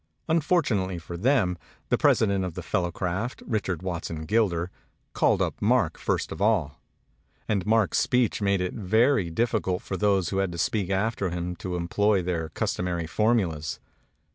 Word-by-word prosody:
Unfortunately 150 - +1
for 85 +1 -7
them 95 -3 +2 0.3
the - - +3
president 100 -3 +3
of 90 -3 -4
the - - -5
Fellowcraft, 90 +6 -2
Richard 95 -7 -2
Watson 85 -3 -4
Gilder, 90 -3 +1 0.4
called - - +3
up - - -4
Mark - - +2
first - - -1
of 80 - -6
all; 100 -10 +1 0.7
and 100 -3 0
Mark's 110 -2 +3
speech 125 -3 +1
made 100 -2 +2
it 90 - -2
very 110 0 +2
difficult 95 -1 0
for 95 - -4
those 100 -4 +2
who 95 - -2
had 95 -2 0
to - - -6
speak 95 +1 0
after 100 0 0
him 90 +1 -3
to 90 -1 -4
employ 95 +3 +1
their 85 -3 -2
cus - - -1
tomary 85 -2 -2
formulas. 90 -7 0
95 Hz, 160 wpm, -26 LUFS, 85-110 Hz, 0.7 s, the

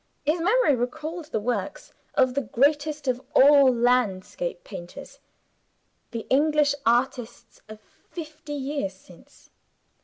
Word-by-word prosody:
His 315 +3 +1
memory 410 - +3
recalled 305 +7 -4
the 295 - -3
works 210 -3 -4 0.2
of 255 -2 +3
the 280 - 0
greatest 290 +5 0
of 255 0 0
all 280 -1 +7
landscape 245 - 0
painters 175 - -10 0.9
the 230 -2 -6
English 295 +1 +3
artists 240 -1 -1
of 215 0 -10 0.3
fifty 310 -2 -8
years 275 -8 -3
since. 180 -2 -20
270 Hz, 115 wpm, -25 LUFS, 240-305 Hz, 0.9 s, all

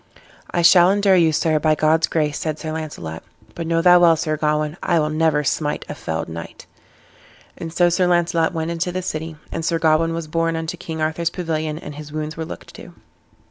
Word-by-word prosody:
"I 175 - 0
shall 175 +1 +7
endure 200 -1 +3
you, 165 -3 +4
sir, 155 0 +1
by 155 0 +2
God's 155 +2 +2
grace," 150 -3 -1
said 155 -2 -3
Sir 155 0 -5
Launcelot, 145 - -6 0.3
"but 165 -1 -5
know 165 0 +1
thou 180 -1 +7
well 170 -2 +6
Sir 155 -1 -1
Gawain, 150 0 -1
I 170 - +1
will 155 0 0
never 155 -1 +1
smite 150 +1 -1
a - - -5
felled 80 0 -4
knight." 85 0 -9 0.9
And 165 - -7
so 175 +1 +3
Sir 175 +1 +2
Launcelot 170 -2 +2
went 165 -1 -3
into 170 +1 -2
the 185 +1 -4
city, 160 -1 -4 0.2
and 165 - -4
Sir 165 0 +1
Gawain 165 0 +2
was 165 -1 -4
borne 165 +1 0
into 160 +1 -3
King 160 -2 -6
Arthur's 160 +2 0
pavilion, 160 -3 -3
and 150 - -8
his 150 0 -9
wounds 155 +1 -4
were 160 - -4
looked - - -10
to. - - -12
160 Hz, 210 wpm, -21 LUFS, 155-170 Hz, 0.9 s, shall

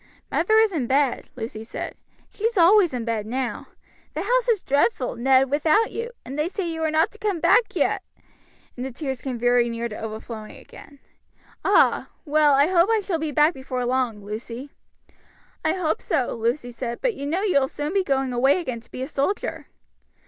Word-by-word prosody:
"Mother 360 +7 +2
is 440 -1 +5
in 290 -9 -2
bed," 270 0 +1
Lucy 225 -2 -6
said. 225 - -6 0.3
"She's 455 +1 -2
always 360 +1 +6
in 245 -3 -4
bed 220 -3 -2
now; 255 +1 -3 0.5
the 315 - -2
house - - +1
is 435 -5 +2
dreadful, 280 - +1
Ned, 265 +2 +3
without 315 +10 +3
you, 465 +1 -4 0.2
and 270 +4 -6
they 305 - +1
say 380 0 -3
you 325 -1 -4
are 320 - +1
not 315 +2 +2
to 440 - -16
come 410 -6 -1
back 465 +7 +3
yet," - - +1 0.7
and 250 - -5
the 265 - -3
tears 265 -1 -5
came 260 -3 -4
very 245 0 +3
near 230 0 -3
to 215 - -8
overflowing 220 0 -7
again. 285 - -14 0.7
"Ah! - - +3 0.2
well, 300 -1 +4
I 280 +1 +5
hope 350 +3 +3
I 445 - +3
shall 370 -5 -2
be 315 0 -2
back 300 +4 +4
before 260 -2 -4
long, 240 -5 -1
Lucy." 230 +6 -7 0.9
"I - - +2
hope 350 -4 -1
so," 275 -7 0
Lucy 240 +2 -2
said; 235 0 -5
"but - - 0
you 280 -6 -5
know 350 +7 -1
you 370 -9 +3
will 265 - 0
soon 295 +4 -4
be 395 -1 +2
going 270 -5 0
away 265 +7 +3
again 255 -9 -4
to 230 - -19
be 255 - -5
a - - -4
soldier." 305 +7 -2
280 Hz, 200 wpm, -24 LUFS, 245-345 Hz, 0.9 s, always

